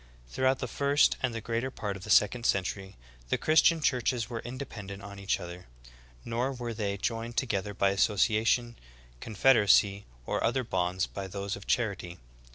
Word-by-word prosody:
Throughout 130 - +1
the 125 - -4
first 140 +4 +3
and 130 - 0
the 115 0 -5
greater 115 +3 -1
part 105 -6 -4
of 95 - -9
the 105 - -9
second 105 +4 +4
century, 95 0 -1 0.3
"the - - +1
Christian 160 +1 +4
churches 125 -3 0
were 115 - -3
independent 115 -6 -7
on 100 0 -9
each 100 0 0
other; 90 +1 -9 0.6
nor 120 +3 -1
were 120 -2 -5
they 100 -2 -2
joined 115 +3 -3
together 105 -5 -1
by 100 0 +2
association, 110 +4 +2 0.4
confederacy, 105 - +3 0.2
or - - -1
other 130 +3 +1
bonds 90 -3 -1
but 95 -2 -7
those 100 0 -3
of 100 - -12
charity. 100 -7 -1
110 Hz, 165 wpm, -29 LUFS, 100-120 Hz, 0.6 s, second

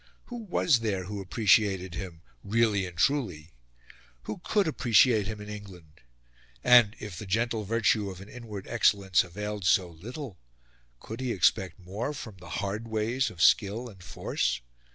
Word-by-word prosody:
Who 245 - -7
was 180 - +2
there 105 -5 -1
who 100 +2 -5
appreciated 95 -2 +2
him, 85 -2 -7 0.2
really 105 -2 +1
and 85 -2 -11
truly? 90 - 0 0.7
Who 110 - -6
COULD 205 +2 +1
appreciate 115 -6 +4
him 110 -1 -5
in 105 - -9
England? 95 -7 -11 0.6
And, 120 -3 +6
if 105 -4 -7
the 105 - -7
gentle 115 +2 0
virtue 110 -1 +1
of 95 -1 -8
an 100 - -11
inward 110 -4 -8
excellence 100 -5 +3
availed 105 +3 -5
so 90 0 +3
little, 110 - -8 0.6
could 110 +2 -8
he 130 -2 -1
expect 95 -2 +2
more 100 +10 -5
from 110 -7 -8
the 85 -2 -12 0.2
hard 105 +4 -4
ways 115 +4 0
of 90 -6 -2
skill 110 +4 +3
and 95 -5 -15
force? 65 -7 -2
105 Hz, 155 wpm, -28 LUFS, 95-115 Hz, 0.7 s, And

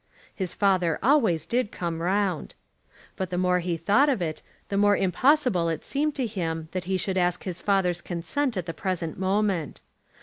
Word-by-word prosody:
His 185 -4 -4
father 185 -5 +2
always 230 - +3
did 240 -3 0
come 170 -2 -4
round. 185 -1 -1 0.6
But 190 -2 -3
the 180 - -3
more 180 0 +2
he 175 -1 -2
thought 210 - +3
of 265 - +1
it, 160 -3 -3 0.3
the 200 - -2
more 205 0 +4
impossible 195 - +2
it 160 -2 -4
seemed 295 +1 0
to 260 - 0
him 165 -7 -3
that 185 -1 -4
he 190 +1 0
should 190 0 -1
ask 180 0 0
his 180 -2 -5
father's 180 -4 +1
consent 220 - -2
at 180 - -2
the 165 - -4
present 175 -4 -3
moment. 190 -4 0
185 Hz, 180 wpm, -26 LUFS, 170-205 Hz, 0.6 s, more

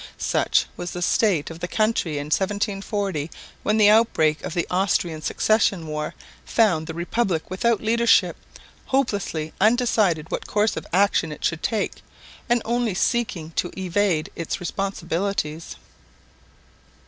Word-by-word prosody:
Such - - +1
was 175 0 -5
the 180 - -5
state 175 -7 +2
of 165 - -9
the 180 - -3
country 215 -6 0
in 145 - -3
1740, 195 -4 -1 0.3
when 210 +1 +1
the 210 -1 +6
outbreak 160 -9 +3
of 170 - -5
the 170 - 0
Austrian 180 -4 0
Succession 200 +1 +1
War 150 0 -4 0.3
found 175 -9 +2
the 160 - -6
Republic 175 -1 -1
without 220 +3 +1
leadership, 235 +1 +3 0.5
hopelessly 200 - -1
undecided 215 -8 +2
what - - -3
course 210 +1 +1
of - - -6
action 185 -3 +2
it 150 - -5
should 165 -1 0
take, 220 -3 -2 0.5
and 240 -1 +2
only 235 -3 0
seeking 185 -8 -1
to 175 - 0
evade 185 -3 0
its 165 - -3
responsibilities. 175 -3 -3
190 Hz, 135 wpm, -23 LUFS, 165-215 Hz, 0.5 s, the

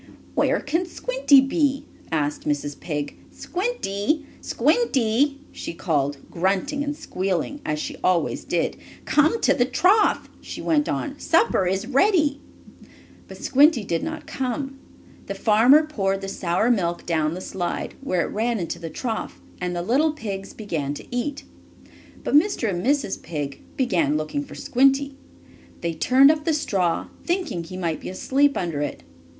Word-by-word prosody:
"Why, - - +2
where - - +1
can 330 +5 -1
Squinty 430 - +4
be?" 275 0 0 0.3
asked 150 -2 -1
Mrs. 145 -1 -2
Pig. 145 -3 -4
"Squinty! 305 - -2 0.2
Squinty!" 275 - +1
she - - -6
called, 145 -5 0
grunting 195 - 0
and 290 0 -3
squealing 195 - -2
as 150 - -1
she - - -5
always 180 -2 +1
did. - - -1 0.3
"Come 310 +9 +3
to - - +4
the 245 - +2
trough!" 370 - +3
she - - -8
went 295 -2 +1
on. 290 -1 -3
"Supper 260 - +2
is 190 +3 0
ready!" 290 - +2 0.9
But - - -10
Squinty 285 -3 +4
did 170 -4 -1
not 315 -1 -5
come. 270 +1 -3 0.5
The - - -4
farmer 240 +8 +5
poured 195 -10 -1
the 195 - -5
sour 195 +4 +1
milk 175 -6 0
down 160 -1 0
the - - -5
slide, 180 -1 -4
where 185 -10 0
it - - -3
ran 230 +2 0
into 170 -4 -4
the 165 - -6
trough, 225 +5 -4 0.2
and 180 -1 -2
the 175 - -2
little 290 - +2
pigs 200 -8 -5
began 155 -9 -3
to - - -9
eat. 285 +3 -2 0.8
But - - -2
Mr. 305 - +3
and 180 -3 -2
Mrs. 275 -5 0
Pig 145 -4 -5 0.2
began 170 - +2
looking 155 - -2
for 280 - -11
Squinty. 275 +2 +2 0.7
They 170 -1 -1
turned 260 - +6
up 310 -1 -2
the 320 -1 +1
straw, 190 - 0
thinking 345 - -1
he 185 +3 -8
might 170 -4 -2
be - - -7
asleep 275 +9 +2
under 165 -5 -2
it. 145 - -4
235 Hz, 155 wpm, -24 LUFS, 175-290 Hz, 0.9 s, turned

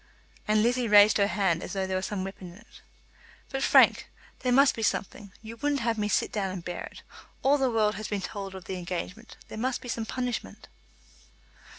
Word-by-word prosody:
And 215 0 +3
Lizzie 245 +1 +1
raised 205 -1 +6
her 200 - +4
hand 180 -3 0
as - - -6
though 195 -1 -1
there 190 0 -2
were 185 - 0
some 195 0 -3
weapon 190 -2 -8
in - - -15
it. 230 - -18 0.7
"But, 270 -1 -3
Frank, - - +5 0.3
there 250 - -1
must 275 +2 +5
be 225 - -5
something. 205 -1 -2
You 225 +1 -9
wouldn't 285 +1 0
have 230 -1 0
me 210 - 0
sit 210 - 0
down 200 -3 -2
and 185 -2 -7
bear 175 - -5
it. - - -13 0.4
All 285 +2 +4
the 265 -1 +2
world 215 -2 +2
has 215 0 -5
been 205 -2 -3
told 195 -1 -6
of 185 - -9
the 190 - -4
engagement. 180 +5 -6
There 220 - -8
must 255 +2 -1
be - - -11
some 225 -1 -3
punishment." 250 -2 -4
210 Hz, 215 wpm, -27 LUFS, 190-235 Hz, 0.7 s, raised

